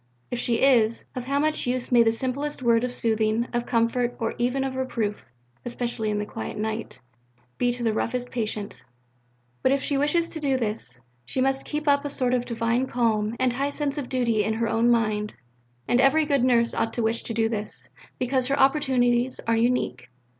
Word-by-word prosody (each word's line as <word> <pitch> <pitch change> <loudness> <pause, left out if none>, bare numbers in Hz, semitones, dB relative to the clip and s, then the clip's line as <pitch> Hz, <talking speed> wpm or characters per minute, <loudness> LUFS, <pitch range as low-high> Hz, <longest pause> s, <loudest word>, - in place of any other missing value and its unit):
If 245 - -2
she 235 0 0
is, 235 -4 +3
of 250 -1 -4
how 275 +2 0
much 305 -2 0
use 250 0 -1
may 240 -1 +6
the 225 -1 +4
simplest 260 +4 -3
word 235 -1 +3
of 250 - -1
soothing, 220 0 0
of 240 0 -1
comfort, 240 +1 +1
or 225 - -1
even 250 +3 +1
of 265 -1 -3
reproof 230 -5 -2 0.4
especially 235 -2 -3
in 210 - -1
the 210 - -2
quiet 110 - -6
night 220 +1 -4 0.6
be 245 0 +2
to 245 0 -3
the 225 -2 +1
roughest 245 +3 -2
patient! 215 -4 -4 0.8
But 260 - +3
if 275 -1 +1
she 280 -2 +1
wishes 330 +4 +2
to 320 - -5
do 275 -3 +1
this, 215 - -2 0.2
she 190 - -1
must 270 +1 +1
keep 300 0 -3
up 285 0 +4
a 290 - -3
sort 255 -3 0
of 245 -1 +1
divine 235 +2 0
calm 225 -3 0
and 255 -1 +2
high 275 +3 -1
sense 290 0 -2
of 270 - -5
duty 235 -5 +1
in 220 +1 -1
her 230 +1 0
own 225 +1 +2
mind." 215 -3 +1 0.5
And 245 - +3
every 295 +4 +4
good 280 -4 +1
nurse 235 -2 +3
ought 225 0 -1
to 235 - -1
wish 225 +1 0
to 230 - -5
do 225 -1 +2
this, 215 -2 -5 0.3
because 255 0 0
her 275 - 0
opportunities 260 -3 +2
are 230 - +2
unique. 225 - 0
245 Hz, 205 wpm, -25 LUFS, 225-265 Hz, 0.8 s, may